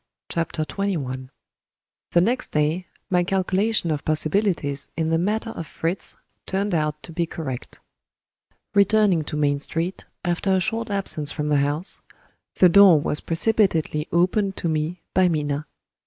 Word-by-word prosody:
CHAPTER 165 -1 -1
XXI 140 -10 -3 0.8
The 170 - +5
next 245 +7 0
day, 155 +4 0 0.2
my 180 -1 +3
calculation 190 0 +1
of 150 -2 -2
possibilities 155 -2 0
in 160 -1 0
the 165 - +2
matter 215 +5 -1
of 165 -7 -7
Fritz 170 +3 -3 0.3
turned 195 +1 -1
out 150 -2 -1
to - - -8
be 170 0 -1
correct. 135 -7 -6 0.9
Returning 200 -4 +4
to 150 - -4
Main 145 -1 +1
Street, 165 +5 -4 0.2
after 175 +2 +1
a - - +3
short 225 +4 -1
absence 185 -7 0
from 150 -1 -2
the 150 - +3
house, 145 +6 -1 0.5
the 185 - +6
door 185 -2 +7
was 145 +1 -1
precipitately 165 -5 +1
opened 190 +3 +1
to - - -2
me 160 +2 -2
by 185 0 +4
Minna. 150 -2 -1
170 Hz, 145 wpm, -23 LUFS, 150-195 Hz, 0.9 s, door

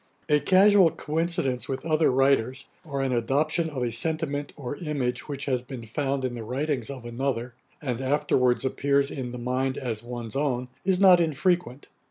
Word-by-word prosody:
A 150 0 +5
casual 190 +1 +6
coincidence 155 -5 -1
with 135 +3 -4
other 155 -1 +3
writers, 135 0 +2 0.2
or 140 -5 -3
an 135 - 0
adoption 145 +7 +1
of 135 -5 -3
a 120 - -1
sentiment 145 +3 -2
or 140 -1 -6
image 145 -7 -2
which 140 -2 -5
has 130 -3 0
been 125 -1 -8
found 135 +3 -2
in 125 - -2
the 120 -2 -6
writings 130 +1 -2
of 130 -4 -7
another, 120 0 -3 0.3
and 125 -3 -2
afterwards 130 -2 +2
appears 140 +1 +1
in 125 -3 -5
the 125 - -6
mind 130 +2 -1
as 115 -5 -3
one's 120 -2 -6
own, 130 -3 -1
is 185 -1 +2
not 185 -3 +7
unfrequent. 165 -3 0
135 Hz, 175 wpm, -26 LUFS, 125-150 Hz, 0.3 s, not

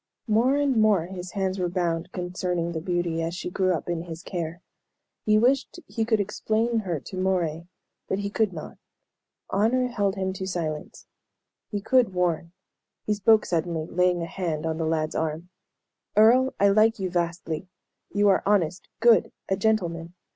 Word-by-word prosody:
More 235 +4 +3
and 285 -3 +2
more 210 -6 +4
his 180 0 -7
hands 190 -1 -1
were 180 -1 0
bound 170 -2 -1
concerning 180 -1 -2
the 160 -2 -4
beauty, 175 -1 -1
as 165 +1 -2
she 180 -1 -5
grew 185 -1 +1
up 160 - -6
in 170 -1 -2
his 165 0 -8
care. 170 -3 -4 0.7
He 215 0 +5
wished 260 +8 +2
he 225 -2 -2
could 220 -1 +2
explain 220 +3 0
her 175 -7 -2
to 185 - -8
Moray, 175 -3 0 0.4
but 190 - -1
he 200 0 -3
could 215 -2 +1
not. 160 -3 -9 0.7
Honor 250 +5 +2
held 205 -5 0
him 190 -1 -2
to 190 0 -5
silence. 160 -5 -4 0.6
He 205 -2 -3
could 235 -3 +3
warn. 170 -2 0 0.5
He 210 - +1
spoke 215 +1 +4
suddenly, 165 -2 -1
laying 180 0 +1
a - - -2
hand 165 -3 -3
on 160 0 -2
the 160 - 0
lad's 155 -1 0
arm. 160 +2 -3 0.7
"Earle, 250 +5 +5
I 200 - +5
like 215 +3 +4
you 190 -3 -3
vastly. 170 -1 -2 0.4
You 205 0 +3
are 195 - +4
honest, 185 -4 +1
good, 235 -1 +5 0.2
a 190 - +2
gentleman. 180 -5 -1
185 Hz, 170 wpm, -26 LUFS, 170-215 Hz, 0.7 s, He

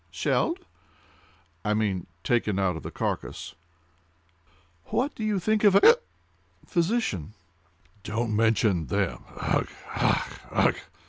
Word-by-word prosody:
"Shelled!" 350 +3 0 1.0
"I 105 0 +1
mean 100 -5 -1 0.2
taken 110 -5 +1
out 95 -3 +1
of 80 - -6
the - - -6
carcass." - - -4 1.3
"What 270 +4 0
do 220 - -6
you 215 -2 +1
think 215 +4 +1
of 200 -2 +6
a—hic 200 - +6
cup!—physician?" 170 - -4 0.7
"Don't 110 +2 -2
mention 110 - +2
them!—ugh! - - -1 0.3
ugh! - - +1 0.2
ugh!" - - +3
115 Hz, 110 wpm, -27 LUFS, -, 1.3 s, of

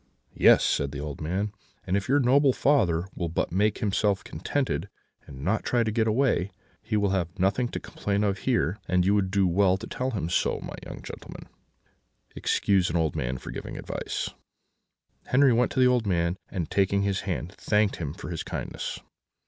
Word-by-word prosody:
"'Yes,' - - +6
said 70 -1 +1
the 70 - -6
old 75 0 -6
man, 95 +7 -1 0.3
'and 95 - 0
if 100 +2 -1
your 145 +2 +4
noble 135 +1 +4
father 95 - +2
will 85 -2 -3
but 85 - -1
make 105 +4 +2
himself 100 -1 +1
contented, - - -2 0.4
and 65 0 -9
not 105 +4 +1
try 120 -1 +2
to 110 - -1
get 110 0 +1
away, 110 -5 +2 0.3
he 110 - -1
will 100 -2 +2
have 90 -3 -2
nothing 100 +7 +1
to - - -5
complain 100 0 -2
of 100 -1 0
here, 80 +9 0
and 90 -1 +2
you 100 - +4
would 100 -2 +2
do 100 0 +2
well 95 +1 +3
to - - -8
tell 130 +1 -3
him 105 -9 -2
so. 85 - +1
My - - -6
young - - -9
gentleman, - - -9 0.9
excuse 95 -3 +2
an 80 - -3
old 80 -3 +1
man 60 +1 -2
for - - -8
giving - - -6
his - - -6
advice.' - - -4 1.0
"Henri 135 0 +5
went 120 +2 +2
up - - -8
to - - +1
the 125 - +7
old 125 -4 +2
man, 85 -2 +1
and, 85 -4 -4
taking 100 0 +2
his 100 -1 0
hand, 90 -3 -3
thanked 105 -1 +2
him 75 -2 -4
for 90 - -7
his 80 - -3
kindness. - - -5
100 Hz, 200 wpm, -27 LUFS, 85-110 Hz, 1.0 s, the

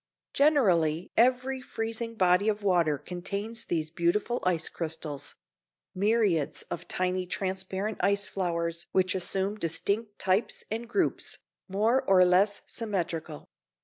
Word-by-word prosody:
Generally 180 - +3
every 255 +2 +2
freezing 230 -1 -4
body 185 +1 +3
of 210 -1 -2
water 170 -6 +3
contains 200 - -4
these 155 -2 -2
beautiful 175 +8 0
ice 170 -3 +1
crystals; 155 -3 -4 0.6
myriads 200 -6 +1
of 170 - -5
tiny 185 0 -1
transparent 190 +3 -3
ice 200 +2 +2
flowers 170 -2 -2
which 185 0 +3
assume 195 +3 -2
distinct 205 +6 -1
types 190 +4 0
and 230 +2 -4
groups, 375 - 0 0.3
more 220 +7 +2
or 185 -1 +7
less 195 +3 +3
symmetrical. 175 -8 -3
190 Hz, 115 wpm, -28 LUFS, 175-220 Hz, 0.6 s, or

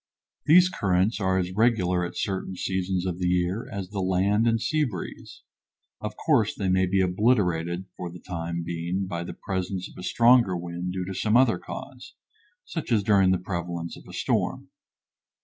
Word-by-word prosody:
These 175 +4 +7
currents 100 - +1
are 95 -2 +1
as 90 -1 -1
regular 95 -4 +2
at 85 - -5
certain 95 -1 -2
seasons 95 0 -1
of 90 -1 -3
the 90 - 0
year 90 +4 0
as 95 -1 -5
the 100 - -3
land 95 +4 +2
and 115 0 +2
sea 155 +6 +1
breeze. 105 - -6 0.6
Of 105 0 -5
course, 120 -9 +2
they 95 -2 -1
may 95 0 +3
be 95 +1 +2
obliterated 90 -3 +1
for 90 - -5
the 85 - -10
time 85 -1 -4
being, 85 +3 -2
by 85 -2 -4
the - - -7
presence 95 -1 -3
of - - -14
a - - -6
stronger 115 -4 +4
wind 85 +1 -4
due 90 0 -3
to 95 - -5
some 110 +4 +2
other 120 -8 +4
cause, 85 - -9 0.5
such - - -5
as 110 -3 +3
during 95 -2 +4
the 95 - +3
prevalence 85 -2 -4
of - - -14
a - - -10
storm. - - -1
95 Hz, 185 wpm, -26 LUFS, 90-105 Hz, 0.6 s, These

